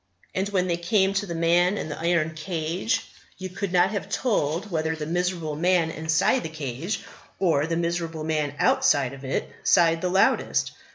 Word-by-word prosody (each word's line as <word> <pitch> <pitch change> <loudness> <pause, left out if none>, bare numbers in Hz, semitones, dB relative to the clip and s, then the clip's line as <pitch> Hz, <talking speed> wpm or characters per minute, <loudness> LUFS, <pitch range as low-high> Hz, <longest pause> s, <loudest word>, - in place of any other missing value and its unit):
And 190 +2 -1
when 185 -3 +1
they 170 -2 0
came 190 +3 +2
to 200 +1 -1
the 170 - -4
man 175 +4 +3
in - - -3
the 150 - -6
iron 165 -1 +1
cage, 165 +7 -2 0.3
you 185 0 -6
could 185 +1 -4
not 180 +2 +3
have 205 - -4
told 195 - -1
whether 160 -1 0
the 155 -1 -5
miserable 170 -2 -1
man 170 0 +2
inside 160 +11 +1
the 160 - -5
cage 155 - -4 0.4
or 160 -5 +2
the 165 0 -1
miserable 170 -2 -2
man 155 -2 -1
outside 255 - +3
of 140 0 -11
it 135 - -2 0.2
sighed 165 -1 +4
the 180 - 0
loudest. 190 +2 +2
170 Hz, 180 wpm, -25 LUFS, 160-185 Hz, 0.4 s, sighed